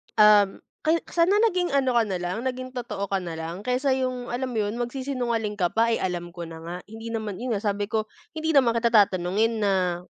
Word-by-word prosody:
"Um, 210 -2 +6 0.2
kay 320 +2 +3 0.2
sana 345 +4 +4
naging 360 -4 +1
ano 260 -2 +2
ka 235 -1 +4
na 190 -2 -1
lang, 175 +3 -3
naging 255 0 -4
totoo 230 -5 -4
ka 195 - +2
na 170 -2 -6
lang 165 +3 -5
kaysa 250 +4 0
yung," 255 -2 -2
alam 255 +1 -2
mo 225 - -3
yun, 220 +4 -4
"magsisinungaling 240 -4 -2
ka 175 -1 +2
pa, 230 +1 +2
eh, - - 0
alam 175 -2 -3
ko 170 -2 -6
na 165 0 -9
nga. 170 +1 -5
Hindi 225 +1 -8
naman," 215 -4 -3
yun 245 -1 -2
nga, 200 - -2
sabi 205 -1 -1
ko, 215 -1 0 0.3
"Hindi 320 0 -2
naman 245 -4 +5
kita 235 - +2
tatanungin 205 +1 +3
na 185 -3 +1
225 Hz, 220 wpm, -25 LUFS, 195-255 Hz, 0.3 s, Um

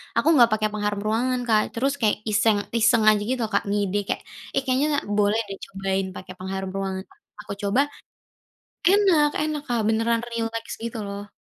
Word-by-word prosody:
aku - - +1
enggak 240 -6 +6
pakai 215 0 +1
pengharum 205 -1 -2
ruangan 250 +3 +1
Kak, 215 -1 +5
terus 270 +4 0
kayak 215 -2 +3
iseng-iseng 220 +1 +3
aja 210 -1 +3
gitu 255 -2 0
loh 220 - -3
Kak, - - +2
ngide 205 -1 0
kayak, - - -2 0.3
"Eh, 275 - +3
kayaknya 265 +3 +2 0.3
boleh 210 +2 +3
deh 195 - -5
cobain 195 0 -2
pakai 185 - -8
pengharum 190 0 -4
ruangan." 190 -1 -3
Pas - - -24 0.2
aku - - -6
coba 200 +7 +3 1.1
enak 370 -7 +4
enak 305 -1 -2
Kak, 240 -2 +1
beneran 225 +1 +2
rileks 230 -1 -3
gitu 230 0 -4
loh. 200 +1 -7
220 Hz, 175 wpm, -24 LUFS, 200-240 Hz, 1.1 s, enggak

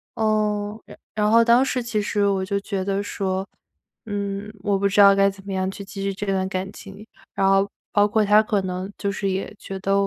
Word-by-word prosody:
嗯， 215 -1 0
然 - - -13 0.2
然 210 0 +2
后 230 +1 +6
当 235 +2 +5
时 250 -2 -1
其 220 -3 -1
实 205 0 0
我 195 -1 0
就 200 +1 -1
觉 195 -2 -3
得 200 0 -1
说， 190 -1 -2 0.6
嗯， 200 0 -4
我 200 -1 +1
不 200 - +2
知 200 +1 +4
道 200 0 +8
该 195 0 +4
怎 195 0 -11
么 200 - -6
样 190 0 -1
去 200 +1 -7
继 195 0 -8
续 195 0 -1
这 200 +2 -5
段 190 -1 0
感 190 0 -4
情， 200 +1 -12 0.3
然 195 0 +2
后 195 +1 +3 0.2
包 205 0 +4
括 215 +1 +2
他 210 +1 +6
可 215 -2 0
能 185 +1 -4
就 200 -1 -2
是 200 -1 -2
也 190 +2 -3
觉 195 - -6
得， 195 +1 0
200 Hz, 245 characters per minute, -23 LUFS, 195-210 Hz, 0.6 s, 道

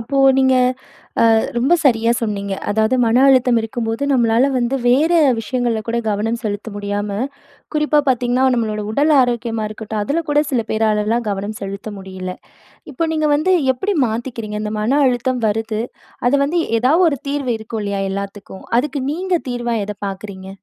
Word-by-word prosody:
அப்போ 275 +4 -2 0.2
நீங்க 260 -1 +4 0.8
அ - - +5 0.2
ரொம்ப 270 +8 +3
சரியா 230 -3 +3
சொன்னீங்க. 200 -3 -3 0.2
அதாவது 220 +4 +2
மன 230 +1 +3
அழுத்தம் 250 -3 +4
இருக்கும்போது 225 +2 -3
நம்மளால 240 +1 +3
வந்து 245 +1 0
வேற 290 +7 +3 0.3
விஷயங்கள்ல 235 -1 -1
கூட 235 +1 -1
கவனம் 225 +3 -1
செலுத்த 205 +1 -4
முடியாம, 205 0 -3 0.7
குறிப்பா 300 0 +3
பாத்தீங்கன்னா 250 0 +1
நம்மளோட 215 -2 -2
உடல் 295 +6 +3
ஆரோக்கியமா 235 -2 -1
இருக்கட்டும், 215 0 -5
அதுல 320 +9 -1
கூட 295 0 +3
சில 245 -4 +1
பேராலலாம் 220 +1 +1
கவனம் 205 +2 -3
செலுத்த 200 +2 -6
முடியல. 185 -1 -6 0.6
இப்போ 330 +5 -1
நீங்க 310 -1 +1
வந்து 315 +6 +2 0.2
எப்பிடி 395 +10 -2
மாத்திக்கிறீங்க? 225 -2 -4
இந்த 210 0 -3
மன 260 +7 +2
அழுத்தம் 250 0 0
வருது, 220 +1 -2 0.5
அத - - 0
வந்து 335 +4 0 0.2
எதாவது 315 +9 +4
1 280 - -3
தீர்வு 280 -4 -1
இருக்கும் 220 0 -5
இல்லயா! 200 -1 -2
எல்லாத்துக்கும். 200 0 -7
அதுக்கு 285 +2 -1
நீங்க 365 +2 -2 0.2
தீர்வா 240 -1 -2
எத 210 - -4
பாக்குறீங்க? 190 -1 -7
230 Hz, 155 wpm, -19 LUFS, 210-260 Hz, 0.8 s, அ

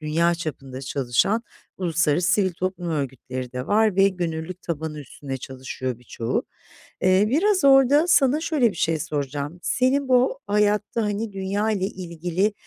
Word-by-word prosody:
dünya 165 +3 +1
çapında 135 -6 -6
çalışan 135 - 0 0.4
uluslararası 175 -1 +1
sivil 190 -3 +2
toplum 185 0 -3
örgütleri 130 -4 -4
de 125 0 -4
var 215 -1 +3
ve 195 0 +6
gönüllülük 175 -1 -4
tabanı 160 -2 -4
üstünde 135 -1 -7
çalışıyor 130 -1 -6
birçoğu. 115 -1 -3 0.6
Eee, 185 +2 +4
biraz 370 - +2
orada, 275 +3 +6
sana 285 -3 +4
şöyle 300 -8 +2
bir 190 - -11
şey 160 0 +1
soracağım: 145 +2 -4
Senin 255 +9 +1
bu 255 +1 +3
hayatta, 210 +2 +1
hani, 210 +1 -2
dünya 195 +3 -1
ile 200 -3 0
ilgili, 180 +1 -2
180 Hz, 140 wpm, -23 LUFS, 150-210 Hz, 0.6 s, ve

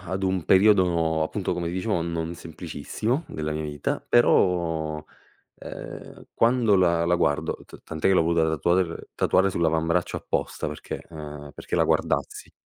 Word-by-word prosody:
ad 95 +2 -3
un 95 -3 -1
periodo 90 -5 +4
appunto 80 - -2
come 85 -1 -3
ti 85 - -4
dicevo 95 -1 -1
non 85 0 -3
semplicissimo 85 - -4
della 75 0 -3
mia 75 0 -3
vita, 75 -1 -3
però, 80 -8 +2 0.5
ehm, - - -9
quando 115 -3 +3
la 85 -2 +3
la 90 - +3
guardo 75 -4 0
ta - - -14
tant'è 80 +3 -1
che 95 - +5
l'ho 90 - +4
avuta 85 0 +2
da 80 - +2
tatuar 85 +3 0
tatuare 95 +1 +3
sull'avambraccio 85 0 0
apposta - - -3
perché, 75 - -6
ehm, 75 -2 -9
perché - - -6
la - - +4
guardassi. - - -1
85 Hz, 155 wpm, -25 LUFS, 80-95 Hz, 0.5 s, che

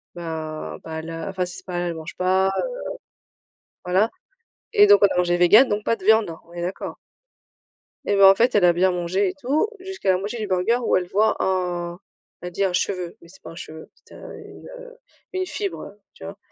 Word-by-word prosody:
bah, 160 -2 -6
bah, 160 0 -6
là 165 +1 -6
enfin, 185 -1 -2
si 180 - -9
c'est 190 - -13
pas 180 - -6
halal 175 0 -1
elle 170 - -4
mange 160 +1 -8
pas, 185 +1 +2
heu - - -3 1.1
voilà. 190 +5 +2 0.7
Et 415 -1 +7
donc 410 0 +7
on - - +9
a - - -4
mangé 175 0 +2
végan, 190 +8 +7
donc 210 -3 -2
pas 230 - +1
de 195 - -14
viande, 220 -2 +4 0.2
on 170 - -18
est 175 - -5
d'accord? 180 +2 -4 1.1
Et 205 - +1
bah 195 0 +8
en 195 - +6
fait, 240 +4 +2
elle 200 -3 +5
a 175 - +5
bien 185 +2 +2
mangé 180 +3 0
et - - -5
tout 285 - +1
jusqu'à 380 - -2
la 185 - +2
moitié 205 +5 -5
du 215 - -3
burger 190 +5 +1
où - - +2
elle 180 -1 -3
voit 210 +4 +2
un 175 -2 -2 0.4
elle 180 +1 -6
dit 195 +3 0
un 185 - -1
cheveu, 180 -1 -2
mais 170 - -17
c'est 190 - -18
pas 160 - -10
un - - -12
cheveu, 160 -2 -10
c'était - - -19
un - - -11
une, - - -12
heu, - - -13 0.3
une 370 -1 -2
fibre, 395 +1 -4
heu, 205 - -12
tu - - -12
vois? 195 +1 -8
185 Hz, 230 wpm, -23 LUFS, 175-215 Hz, 1.1 s, on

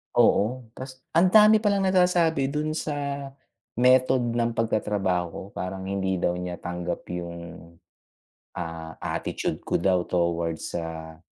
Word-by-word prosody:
oo, 125 +5 +3
tas 130 0 -9 0.2
ang 180 +2 +6
dami 215 0 +8
palang 200 -2 +1
nasasabi 180 -6 +3
dun 150 +2 -2
sa 140 -2 -3 0.5
method 130 0 +4
ng 120 0 +1
pagtatrabaho 105 -5 0
ko, - - -7
parang 95 +1 -4
hindi 95 -1 -1
daw 90 0 0
niya 90 0 -5
tanggap 90 0 -4
yung, 85 -1 -7 0.8
ah, 80 -1 -6
attitude - - -3
ko - - 0
daw 90 0 +2
towards 85 -2 -1
sa 80 -1 -5
100 Hz, 125 wpm, -26 LUFS, 85-140 Hz, 0.8 s, dami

